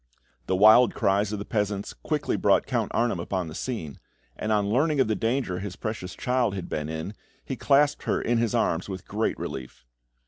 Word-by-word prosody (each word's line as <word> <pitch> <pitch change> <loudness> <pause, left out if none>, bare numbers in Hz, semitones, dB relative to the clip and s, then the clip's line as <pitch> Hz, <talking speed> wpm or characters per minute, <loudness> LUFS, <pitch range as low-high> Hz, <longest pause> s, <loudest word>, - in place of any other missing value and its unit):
The 95 - +1
wild 110 +5 +6
cries 100 +1 +1
of 105 - -2
the 100 - -6
peasants 105 -2 -2
quickly - - -2
brought - - +3
Count - - -1
Arnheim 115 -6 0
upon 90 +1 -2
the - - -8
scene, 80 - -5 0.4
and 110 - -3
on 105 -2 +2
learning 140 +7 +2
of 130 - +4
the 110 - +1
danger 115 -4 -1
his 100 -2 -6
precious 110 -4 -5
child 125 -6 0
had 95 -3 -5
been 75 0 -3
in, 80 +5 -4 0.3
he 135 - -3
clasped 145 +2 +2
her - - +1
in 120 0 +1
his 115 0 0
arms 90 -5 0
with 95 -1 -7
great 110 +2 -1
relief. 65 -2 -7
105 Hz, 200 wpm, -26 LUFS, 95-120 Hz, 0.4 s, wild